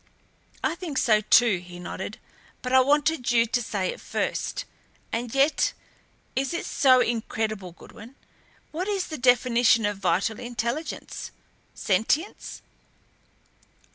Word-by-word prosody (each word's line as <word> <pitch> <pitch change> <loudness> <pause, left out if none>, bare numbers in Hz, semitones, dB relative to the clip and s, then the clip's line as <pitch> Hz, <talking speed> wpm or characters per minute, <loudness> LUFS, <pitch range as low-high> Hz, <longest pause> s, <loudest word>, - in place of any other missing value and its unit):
"I - - +1
think 335 -5 -6
so, 215 -2 +4
too," 220 -2 +4
he 175 0 -11
nodded; 175 - -6 0.5
"but 250 0 -3
I 260 - +8
wanted 290 -1 +2
you 230 -1 +4
to 245 +2 -1
say 200 -5 -2
it - - -13
first. - - -3 0.5
And 235 +2 -3
yet 275 +3 +3 0.6
is 270 +5 -1
it - - -3
so 255 -2 +4
incredible, 215 -5 -2
Goodwin? 225 +8 -14 0.6
What 355 +5 -3
is 395 -3 -1
the 310 - -5
definition 245 -2 +4
of 205 -1 -2
vital 200 +4 0
intelligence 240 +5 -4 0.5
sentience? 225 - -1
240 Hz, 125 wpm, -25 LUFS, 215-275 Hz, 0.6 s, I